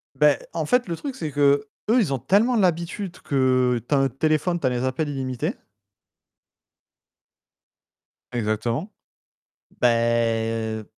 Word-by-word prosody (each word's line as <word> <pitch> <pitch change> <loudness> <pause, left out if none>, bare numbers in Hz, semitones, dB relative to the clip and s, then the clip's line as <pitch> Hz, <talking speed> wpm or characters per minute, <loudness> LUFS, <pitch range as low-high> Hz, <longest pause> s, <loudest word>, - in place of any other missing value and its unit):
Beh, - - +4 0.2
en - - -2
fait, 250 -4 +2
le 170 - -2
truc, 270 - -6
c'est 155 - -4
que, 145 0 +3 0.2
eux, 245 +3 +5
ils 160 -11 +1
ont 130 - -1
tellement 225 - +3
l'habitude 180 0 -1
que: 130 -3 +2
tu 145 - +2
as - - +3
un 135 0 +2
téléphone, 155 +6 0
tu 140 - -3
as - - +3
les 125 0 -2
appels 145 +4 -1
illimités. 130 -3 -3 2.8
Exactement. 115 - -2 0.9
Bah 125 - +6
heu 115 -2 0
135 Hz, 135 wpm, -23 LUFS, 120-170 Hz, 2.8 s, Bah